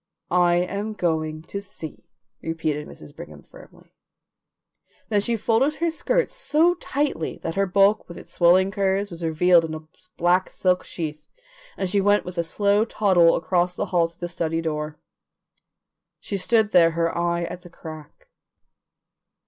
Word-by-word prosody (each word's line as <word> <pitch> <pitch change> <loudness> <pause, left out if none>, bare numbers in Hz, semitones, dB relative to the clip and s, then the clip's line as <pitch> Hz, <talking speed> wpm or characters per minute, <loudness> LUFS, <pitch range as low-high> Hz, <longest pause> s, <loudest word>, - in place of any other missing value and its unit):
"I 175 -1 +4
am 200 +5 -2
going 155 -4 -2
to 200 +4 -6
see," 185 -6 -10 0.3
repeated 160 -2 -3
Mrs. 75 - -13
Brigham 75 -1 -11
firmly. - - -17 1.2
Then 205 -2 +2
she 230 +2 -1
folded 235 +7 +1
her 335 0 0
skirts - - 0
so 345 -8 +2
tightly 285 - -2
that 165 - -3
her 195 +1 +1
bulk 200 +3 +3
with 170 - -10
its - - -11
swelling 185 +3 +4
curves 195 0 0
was 170 0 -8
revealed 165 +2 +4
in 160 -1 -4
a 155 0 -10 0.3
black 180 +2 +2
silk 180 -1 0
sheath, 155 -3 -5 0.6
and 190 - -1
she 200 +2 +1
went 205 +1 +3
with 180 -1 -6
a - - +2
slow 200 +5 +2
toddle 185 -7 +3
across 175 +1 0
the - - -2
hall 170 -2 +3
to 170 +1 -22
the 175 - -3
study 165 -1 -2
door. 150 -2 -3 1.2
She 200 - -5
stood 215 +2 +2
there, 165 -2 +5
her 165 0 0
eye 170 0 0
at 175 +1 -6
the 175 - -13
crack. 160 - -11
180 Hz, 160 wpm, -23 LUFS, 165-200 Hz, 1.2 s, there